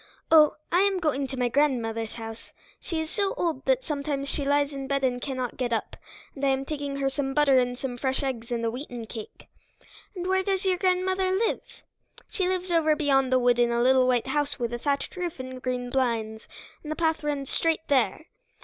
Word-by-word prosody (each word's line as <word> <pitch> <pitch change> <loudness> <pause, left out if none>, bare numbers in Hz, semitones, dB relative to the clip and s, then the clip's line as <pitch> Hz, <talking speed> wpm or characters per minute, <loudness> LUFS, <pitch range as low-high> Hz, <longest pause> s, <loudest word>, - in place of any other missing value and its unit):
"Oh, 310 -2 +7 0.2
I 350 - +4
am 395 0 +3
going 285 -5 0
to 265 - -6
my 250 -1 +2
grandmother's 230 -5 0
house. 225 -1 -8 0.3
She 330 - -3
is 320 +1 -3
so 400 -2 0
old 325 -6 -1
that - - +2
sometimes 280 -2 -2
she 285 - -1
lies 285 +1 +2
in 270 -1 -5
bed 275 0 0
and 250 -1 +1
cannot 255 -3 -3
get 250 -2 -1
up, 225 - -2 0.4
and 280 - -9
I - - +4
am 270 0 0
taking 285 -1 -4
her 275 -1 0
some 270 0 -2
butter 280 -3 +5
and 245 0 -1
some 245 -2 -5
fresh 265 +2 0
eggs 245 -3 -3
and 230 -1 -1
a 225 - 0
wheaten 245 -2 -6
cake." 220 -1 -9 0.7
"And 360 -1 -4
where 380 +1 +2
does 390 0 -1
your 370 -2 +2
grandmother 370 0 +1
live?" 400 +4 +1 0.7
"She 375 -3 0
lives 370 -1 -2
over 315 -2 +3
beyond 270 -4 +2
the 255 - +5
wood 245 -1 +3
in 240 0 +4
a 235 0 +1
little 260 0 +5
white 245 -2 +2
house 290 +2 -1
with 240 -1 -2
a 240 - -3
thatched 280 +5 -1
roof 350 -5 -4
and 255 0 -7
green 250 -1 -3
blinds, 230 -4 -1 0.3
and 305 - -7
the - - -1
path 320 -1 0
runs 285 -2 -2
straight 325 -1 0
there." 280 +3 +1
275 Hz, 215 wpm, -26 LUFS, 250-320 Hz, 0.7 s, Oh